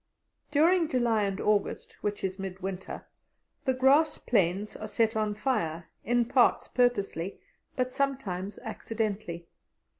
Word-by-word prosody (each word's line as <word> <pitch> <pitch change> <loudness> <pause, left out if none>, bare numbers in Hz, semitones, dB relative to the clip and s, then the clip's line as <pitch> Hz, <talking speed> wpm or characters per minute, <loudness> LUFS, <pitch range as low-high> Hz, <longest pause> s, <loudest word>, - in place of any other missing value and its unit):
During 325 +3 +4
July 235 -4 +2
and 195 -1 -2
August, 210 -1 0
which 205 0 -2
is 190 0 -2
mid 190 -1 -5
winter, 190 0 -5 0.6
the 260 - +3
grass 275 +5 +4
plains 200 -1 +1
are 215 - -6
set 220 +1 +1
on 215 -1 0
fire, 170 - -1
in 240 +1 +2
parts 245 0 +3
purposely, 200 -7 0 0.4
but 255 -1 0
sometimes 210 -9 -2
accidentally. 215 -6 -3
215 Hz, 125 wpm, -29 LUFS, 195-250 Hz, 0.6 s, During